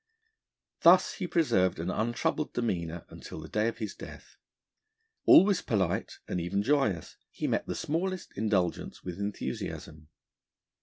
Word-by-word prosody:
Thus 180 +2 +6
he 185 - -4
preserved 95 - +2
an 85 +3 -2
untroubled 120 +8 -1
demeanour 85 -8 -2
until - - -9
the 80 - -8
day 105 +6 0
of 115 - -3
his 110 -4 -4
death. - - -11 0.9
Always 195 0 +7
polite, 95 -6 -1
and 90 - -2
even 100 +4 -1
joyous, 110 - 0
he - - -5
met - - 0
the - - -3
smallest 180 +4 -3
indulgence 100 -4 -1
with 90 0 -6
enthusiasm. 80 -6 -5
105 Hz, 135 wpm, -29 LUFS, 90-150 Hz, 0.9 s, Always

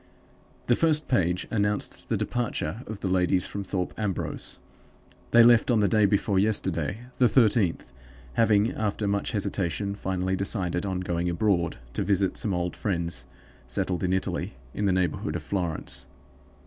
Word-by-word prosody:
"The 120 - +3
first 155 0 +2
page 90 -7 +1
announced 105 -2 -1
the - - +1
departure 115 -5 -2
of 105 -2 -7
the - - -1
ladies 90 0 +2
from 100 - -5
Thorpe 95 -2 -3
Ambrose. 100 -4 -2 0.7
They 120 0 +7
left 120 0 +6
on 120 -3 +4
the 105 - +3
day 110 -1 +4
before 100 -1 +2
yesterday, 95 -2 0 0.2
the 125 -2 +5
thirteenth, 105 - +2 0.4
having, 110 - +3
after 105 -1 -1
much 100 +4 -1
hesitation, 100 -1 -1
finally 95 -1 -1
decided 95 -2 -1
on 95 -1 -2
going 85 -1 -1
abroad, 85 -2 +1 0.2
to - - -2
visit 100 -1 +1
some 105 - -2
old 90 0 -2
friends 85 -9 -2 0.4
settled 90 -2 -1
in 90 - +1
Italy, 95 0 -2 0.2
in 105 - -1
the 100 - +3
neighborhood 90 -3 0
of 85 - -4
Florence. 80 -8 -2
95 Hz, 155 wpm, -27 LUFS, 90-105 Hz, 0.7 s, They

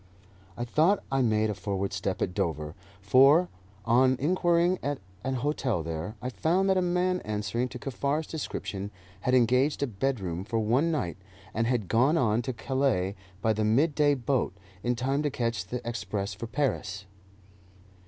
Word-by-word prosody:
I 120 - -2
thought 160 +11 +3
I 135 0 +2
made 110 -2 +2
a - - -2
forward 100 0 -3
step 95 -2 -1
at 90 - -2
Dover, 75 -3 -2 0.3
for, 135 - +5 0.4
on 130 +3 +4
inquiring 175 +3 +2
at 145 0 -2 0.3
an 130 0 -1
hotel 130 - -1
there, 80 +6 -4
I 125 - -1
found 180 +9 +1
that - - +3
a - - +3
man 180 +1 +1
answering 105 +3 -2
to 125 - -7
Kaffar's 140 +5 -2
description 100 -10 -5 0.3
had 125 +6 +1
engaged 130 +4 +3
a - - +3
bedroom 100 -7 -2
for 115 +3 -2
one 120 +9 +2
night, 120 - -2 0.4
and 115 +1 0
had 120 -6 0
gone 130 - +3
on 115 -5 +2
to 130 - -3
Calais 115 -6 0 0.3
by 110 - +3
the 110 0 -1
midday 145 +6 +3
boat, 125 -7 -1 0.2
in 120 +3 0
time 135 +4 0
to 150 - 0
catch 115 -7 -2
the 125 +2 -5
express 105 -3 -3
for 115 +5 -6
Paris. 110 -7 -2
120 Hz, 165 wpm, -28 LUFS, 105-140 Hz, 0.4 s, for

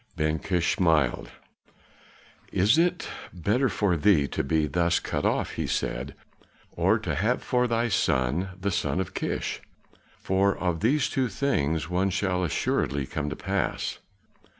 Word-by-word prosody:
Ben 80 +1 0
Kish 90 -3 0
smiled. 80 -8 +2 1.2
"Is 100 +6 +4
it 175 +1 +1 0.2
better 105 +9 +1
for 100 -6 +1
thee 80 -4 +3
to - - -2
be 80 +2 +1
thus 85 +2 +1
cut - - -1
off," - - 0
he - - -3
said, 65 +3 -2 0.6
"or - - +2
to - - -3
have 110 +8 0
for 125 0 +1
thy 115 0 +1
son 85 - +1
the 100 +1 -1
son 90 - -1
of 95 - -3
Kish? - - -3 0.6
For 95 +1 +1
of 90 -3 -1
these 130 - +2
two 130 -1 0
things, 80 - 0
one 90 +3 +1
shall 95 -1 0
assuredly 70 -3 0
come 75 +2 -3
to 75 - -4
pass." - - -2
90 Hz, 150 wpm, -26 LUFS, 80-105 Hz, 1.2 s, Is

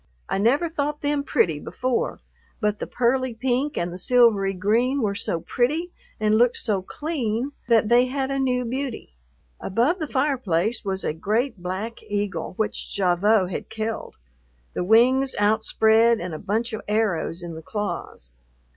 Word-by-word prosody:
I - - -1
never 265 - +3
thought 300 -2 -3
them 290 0 0
pretty 165 - +1
before, 255 +9 -2 0.4
but 210 -2 0
the - - -4
pearly 250 0 0
pink 260 +5 -1
and 170 0 -2
the 180 - -7
silvery 215 -3 +4
green 235 +8 +1
were 200 -2 +1
so 170 -4 -2
pretty 305 - 0 0.3
and 215 0 +3
looked 245 0 +3
so 205 -4 0
clean 260 - -3 0.2
that 225 -3 +4
they 240 +2 +5
had 265 +1 -2
a 275 - -1
new 250 -2 +1
beauty. 255 - -4 0.5
Above 245 - +1
the 310 - -2
fireplace 240 - 0
was 190 -2 -2
a - - -1
great 215 - -1
black 190 +6 -4
eagle 205 -2 -3
which 220 - -3
Gavotte 190 +1 +3
had - - -5
killed, 220 0 -4 0.6
the - - -2
wings 255 +7 +4
outspread 220 +2 +3
and 175 -1 -5
a 155 - -5
bunch 225 +4 -2
of 220 - -3
arrows 200 -5 0
in 170 -1 -6
the 160 - -8
claws. 200 - -5
225 Hz, 160 wpm, -24 LUFS, 200-255 Hz, 0.6 s, they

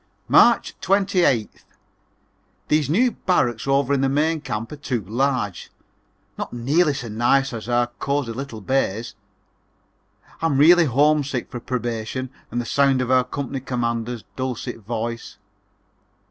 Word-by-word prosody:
March - - +5
28th. 185 - +1 1.1
These 150 -2 +2
new 240 +10 +3
barracks 120 - 0
over 140 0 +2
in 135 - +1
the 135 - +2
main 155 +3 +1
camp 115 -5 -4
are - - -5
too 125 -6 -3
large; 120 -3 -1 0.7
not - - -4
nearly 145 +6 +1
so 125 -4 -5
nice 120 +5 +1
as 115 0 -6
our 120 0 +3
cosey 140 -3 -1
little 120 -2 -6
bays. 120 -1 -1 1.3
I'm 160 -4 +1
really 170 +4 +7
homesick 140 -1 +1
for 120 - -5
Probation 120 +1 -4 0.2
and 120 - -3
the 120 - -3
sound 135 +2 +2
of 125 0 -1
our 130 - +6
old 125 0 0
company 140 -1 -3
commander's 120 -2 -3
dulcet 125 -2 -4
voice. 115 +2 -5
130 Hz, 135 wpm, -22 LUFS, 120-140 Hz, 1.3 s, really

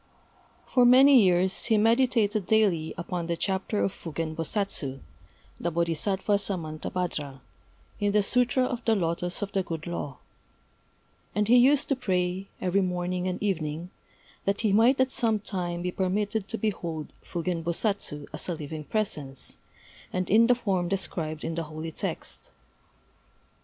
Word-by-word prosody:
For 250 - +6
many 260 +1 +8
years 185 0 +2
he 225 -2 +3
meditated 225 -3 +2
daily 195 -8 +2
upon 170 0 -3
the 170 -1 -1
chapter 195 +3 -1
of 195 - 0
Fugen 160 -1 -5
Bosatsu 165 -5 -1 0.6
[the 170 - -1
Bodhisattva 170 +5 0
Samantabhadra] 160 -5 -3 0.6
in 205 0 +1
the 210 0 +3
Sûtra 250 +3 +2
of 245 -2 -3
the 225 - +3
Lotos 175 +1 -1
of 200 - -4
the 195 - +1
Good 165 -4 -5
Law; 145 -6 -4 1.2
and 210 0 +1
he 240 - +6
used 270 +4 +5
to 275 - +3
pray, 185 -5 -1
every 185 +2 +1
morning 180 0 -1
and 180 - -1
evening, 170 -3 -2 0.5
that 200 +1 0
he 215 -3 +2
might 235 +6 +5
at 260 0 +3
some 225 -4 +2
time 175 -4 -3
be 180 - -1
permitted 200 +3 -1
to 225 - -3
behold 170 -8 -3
Fugen 170 0 -3
Bosatsu 170 -4 -1
as 150 - -2
a 175 - -1
living 155 0 -6
presence, 150 -11 -2 0.5
and 185 0 -2
in 225 +3 +6
the 245 - +5
form 190 -7 -1
described 165 -5 -2
in 165 - -2
the 165 0 -3
holy 155 +1 -6
text. - - -5
185 Hz, 150 wpm, -27 LUFS, 165-215 Hz, 1.2 s, many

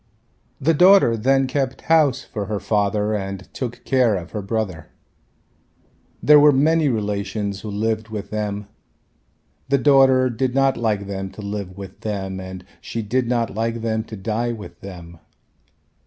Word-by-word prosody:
The 155 +4 +2
daughter 180 -7 +6
then 135 +4 +2
kept 130 0 -2
house 145 -6 +3
for 105 -3 -5
her 105 -2 -2
father 105 0 0
and 95 -2 -4
took 120 -3 -5
care 125 -5 +3
of 90 -2 -6
her 105 - -4
brother. 100 -5 -3 1.4
There 150 0 +8
were 150 0 +7
many 155 +2 +3
relations 100 -2 -2
who 110 - -6
lived 110 +2 -1
with 105 -2 -6
them. 105 -1 -3 1.0
The 140 - +4
daughter 135 -2 +5
did 125 +2 -1
not 135 -1 +3
like 105 -3 -1
them 95 -1 -5
to 105 - -9
live 100 -2 -5
with 95 -1 -9
them 95 -3 -4
and 95 -1 -8 0.2
she 115 - -4
did 120 +4 0
not 120 -3 0
like 115 +2 -2
them 110 -1 -1
to 110 - -8
die 110 +5 -2
with 90 -6 -10
them. 85 -3 -10
110 Hz, 155 wpm, -21 LUFS, 100-130 Hz, 1.4 s, There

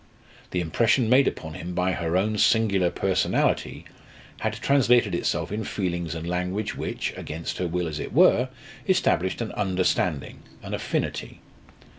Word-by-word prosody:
The 90 - -1
impression 115 - +2
made 135 +2 +6
upon 80 - -4
him 85 +3 -6
by 90 +1 +1
her 85 -1 -1
own 105 +2 0
singular 100 -6 +3
personality - - 0 0.5
had 110 - -1
translated 125 0 +3
itself - - -1
in 110 +2 -2
feelings 85 -6 -3
and 80 +1 -5
language 90 +4 -2
which, - - -3
against 80 +2 -5
her 90 - 0
will 90 +1 -1
as 75 -2 -4
it - - -5
were, 125 +2 +5 0.4
established 95 - +2
an 115 - -3
understanding, 90 -6 -1 0.2
an - - -6
affinity. - - -3
95 Hz, 145 wpm, -25 LUFS, 85-110 Hz, 0.5 s, made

